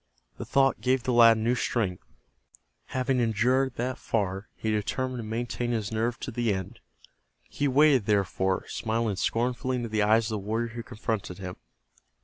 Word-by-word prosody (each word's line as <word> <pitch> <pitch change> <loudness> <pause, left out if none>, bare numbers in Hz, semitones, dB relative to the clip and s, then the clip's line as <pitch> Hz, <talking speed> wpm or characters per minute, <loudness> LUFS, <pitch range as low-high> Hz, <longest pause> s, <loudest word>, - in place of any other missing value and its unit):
The - - -4
thought 135 -1 +2
gave 130 0 +1
the 125 - 0
lad 115 -1 +7
new 115 +2 +1
strength. 110 -6 -1 0.8
Having 130 0 0
endured 125 +3 +2
that 125 +2 -3
far, 100 -2 -2
he 110 - -2
determined 125 +4 -2
to - - -4
maintain 120 +2 -3
his 110 -2 -2
nerve 115 +2 -1
to 130 - -4
the 120 -1 0
end. 95 +4 -4 0.6
He 145 - -2
waited, 135 -4 +4
therefore, 95 -2 +1
smiling 110 -2 -1
scornfully 125 +4 0
into 120 -2 -3
the 110 0 0
eyes 110 +2 +4
of - - -3
the 110 - -1
warrior 110 +4 -2
who 120 +1 -6
confronted 110 -5 -4
him. 90 -1 -6
115 Hz, 165 wpm, -27 LUFS, 105-125 Hz, 0.8 s, lad